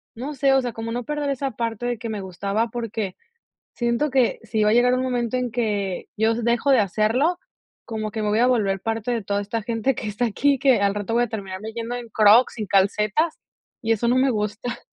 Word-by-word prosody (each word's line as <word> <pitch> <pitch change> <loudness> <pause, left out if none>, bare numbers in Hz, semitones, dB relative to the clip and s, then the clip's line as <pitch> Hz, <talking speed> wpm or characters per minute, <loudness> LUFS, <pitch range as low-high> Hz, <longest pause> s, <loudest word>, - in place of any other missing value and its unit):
no 265 +6 -5
sé, 270 0 +2
o 270 - +4
sea, 245 -1 -3
como 225 0 -5
no 245 +1 -3
perder 295 +1 -2
esa 275 0 -2
parte 230 +1 -3
de 240 -1 -1
que 230 -1 -5
me 210 -2 -4
gustaba, 200 +5 -2
porque 225 -5 -4 0.6
siento 240 +4 0
que 255 -2 +2
si 220 -1 0
va 210 - +4
a - - +3
llegar 245 +1 +4
un 255 - 0
momento 250 -1 -1
en 250 -1 -2
que, 205 -5 -2
yo 220 +1 +3
dejo 235 +3 +1
de 260 -4 +6
hacerlo, 225 - +1 0.5
como 215 -2 -4
que 220 - -4
me 210 - 0
voy 210 +2 +2
a 245 - +5
volver 205 -6 +1
parte 225 +2 -2
de 225 -4 -2
toda 200 +1 -1
esta 220 +2 -3
gente 230 +4 0
que 220 - -5
está 210 +4 -1
aquí, 275 +5 +2
que 260 -5 +4
al 200 0 +2
rato 210 +2 -3
voy 240 - +3
a - - -6
terminar 195 -3 -6
de 220 +1 -6
yendo 230 +1 -4
en 240 -1 -7
Crocs, 220 +4 +5
y - - -2
en - - -4
calcetas, 210 - +2 0.4
y 225 0 +2
eso 225 +1 0
no 245 - +3
me 260 +1 +4
gusta. 215 +1 -3
230 Hz, 240 wpm, -23 LUFS, 210-245 Hz, 0.6 s, de